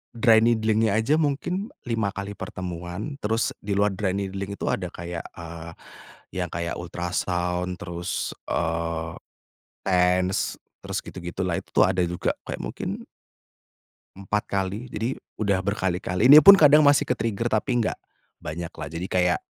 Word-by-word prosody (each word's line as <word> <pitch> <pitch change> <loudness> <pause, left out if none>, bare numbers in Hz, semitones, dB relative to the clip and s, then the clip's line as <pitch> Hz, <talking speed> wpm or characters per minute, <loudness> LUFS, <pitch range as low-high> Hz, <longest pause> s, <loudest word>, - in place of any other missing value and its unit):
dry 115 -1 +6
needling-nya 110 -2 +2
aja 140 +9 +2
mungkin 170 +8 -1 0.2
5 110 -5 -1
kali 100 +1 -4
pertemuan, 90 - -6
terus 115 +2 0
di 100 0 -3
luar 100 0 +3
dry 95 -1 -1
needling 100 0 -4
itu - - -5
ada 90 -2 -2
kayak, 85 0 -6
eee, 85 -1 -8 0.7
yang 90 - -1
kayak 85 0 -3
ultrasound 90 +1 -2
terus, 85 +1 -4 0.2
eee, 85 -1 -1 0.8
TENS 90 0 +2 0.2
terus - - -3
gitu - - -9
gitu 85 +2 -6
lah. 85 0 0
Itu - - -29
tuh - - +8
ada 95 -1 +1
juga 90 0 -1
kayak - - -5
mungkin - - -5 1.1
empat 100 +2 -2
kali. 100 +5 -2
Jadi, 120 +3 -3 0.2
udah 100 -2 +2
berkali 95 -2 -1
kali 95 +6 +1
ini 150 - +12
pun 200 +7 +10
kadang 150 -2 +7
masih 145 -1 +5
ke - - +4
trigger 115 +1 -1
tapi 120 +3 +1
enggak, 115 - 0 0.4
banyak 85 +2 -5
lah 75 -3 -7
jadi 85 +3 -5
kayak, 90 -1 +2
95 Hz, 155 wpm, -25 LUFS, 90-110 Hz, 1.1 s, ini